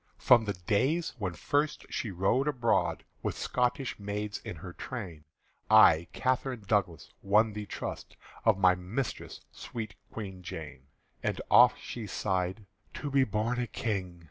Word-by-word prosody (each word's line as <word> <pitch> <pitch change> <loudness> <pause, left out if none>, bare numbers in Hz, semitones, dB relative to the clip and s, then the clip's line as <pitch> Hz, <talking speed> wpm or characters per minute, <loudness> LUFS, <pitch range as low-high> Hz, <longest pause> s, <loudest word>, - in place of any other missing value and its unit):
From 120 -2 +5
the 100 - -1
days 130 - 0
when 95 -4 -2
first 145 - -1
she 115 - -2
rode 100 +9 +1
abroad 125 -6 +1 0.2
With - - -3
Scotish 125 0 -1
maids 105 +1 -4
in - - -6
her 90 +3 -9
train, 90 -12 -7 0.4
I 80 +2 +7
Catherine 130 -2 -1
Douglas 95 -6 0
won 105 +2 +3
the 105 0 -6
trust - - -6 0.3
Of 110 -3 +4
my 95 -2 +5
mistress 95 +8 -4
sweet 115 -2 -6 0.2
Queen 95 -4 -7
Jane. 65 -6 -8 0.3
And - - -1
oft - - +7
she 115 -3 -6
sighed, 95 +1 -2 0.3
"To 140 +5 -4
be 135 -1 +4
born 110 +3 -1
a 120 - -1
King!" 95 -8 -3
105 Hz, 145 wpm, -30 LUFS, 95-125 Hz, 0.4 s, I